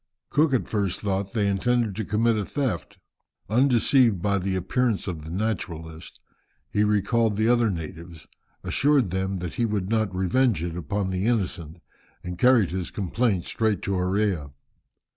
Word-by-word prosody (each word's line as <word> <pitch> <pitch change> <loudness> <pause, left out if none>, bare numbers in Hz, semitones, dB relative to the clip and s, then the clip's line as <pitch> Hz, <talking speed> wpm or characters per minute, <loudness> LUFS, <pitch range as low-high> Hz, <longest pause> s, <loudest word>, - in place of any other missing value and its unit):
Cook 150 0 +3
at 125 - -1
first 100 -4 -1
thought 100 -1 -2
they 105 -3 +1
intended 110 +2 +1
to 110 - -2
commit 110 +3 +1
a 105 - -1
theft. 125 - -3 0.5
Undeceived 120 -3 +4
by 100 +2 +1
the 95 +1 -2
appearance 110 +4 0
of 85 -5 -4
the 80 - -9
naturalist, 85 -5 -4 0.5
he 105 - +2
recalled 105 +1 +1
the 110 +1 +2
other 120 -1 +3
natives, 85 -2 -7 0.4
assured 140 -9 +2
them 95 +1 -1
that 90 -2 -5
he 120 - 0
would 100 -3 -2
not 110 -4 0
revenge 95 0 +1
it 85 -1 -4
upon 95 +3 -2
the 95 +3 -1
innocent, 90 -8 -2 0.4
and 90 0 -6
carried 120 -7 +4
his 90 -1 -3
complaint 100 -1 -1
straight 110 -4 -1
to - - -2
Orea. 90 -4 0
100 Hz, 160 wpm, -25 LUFS, 90-115 Hz, 0.5 s, Undeceived